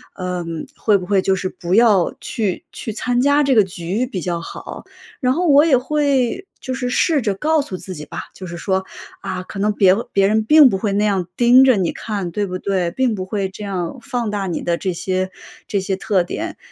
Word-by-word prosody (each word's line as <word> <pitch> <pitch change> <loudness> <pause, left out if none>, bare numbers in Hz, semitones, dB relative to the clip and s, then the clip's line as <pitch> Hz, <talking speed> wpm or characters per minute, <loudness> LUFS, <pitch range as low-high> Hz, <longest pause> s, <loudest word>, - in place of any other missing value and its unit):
嗯 175 -3 -4
会 215 - +3
不 180 - -8
会 195 -2 +2
就 190 - +2
是 185 0 -3
不 175 -1 -4
要 210 -5 +4
去 205 -5 -3
去 220 - -6
参 245 +3 -1
加 285 +3 +4
这 275 -2 +2
个 215 - +6
局 185 +5 -3
比 200 -8 -5
较 175 -1 -2
好？ 165 - -8 0.4
然 255 -1 +2
后 350 +5 0
我 290 0 +6
也 310 -5 +5
会 280 +4 0 0.2
就 260 - -4
是 250 -2 -3
试 315 +3 +2
着 205 - +1
告 310 +11 +1
诉 195 - -6
自 185 0 -7
己 150 -1 -8
吧， - - -6
就 190 - -8
是 170 -1 -7
说： 190 +1 -1 0.4
“啊， 190 -2 -4
可 185 +2 -10
能 210 +2 +1
别 190 -2 +5 0.2
别 195 -1 +3
人 215 +2 +2
并 300 +4 +7
不 195 - -1
会 200 0 -1
那 205 +1 +1
样 195 -4 +1
盯 245 +3 +6
着 255 -4 +5
你 185 -3 0
看， 200 -5 -4
对 205 +4 -2
不 185 -1 -5
对？ 185 -3 -1
并 250 +1 0
不 185 -2 -4
会 195 0 -2
这 195 +2 -9
样 185 -2 -3
放 240 -2 -2
大 205 -2 -2
你 175 - -3
的 170 -1 0
这 185 0 -2
些 185 +2 -2 0.4
这 200 - 0
些 190 0 -1
特 190 -1 +1
点。 175 - -5
200 Hz, 245 characters per minute, -19 LUFS, 185-245 Hz, 0.4 s, 并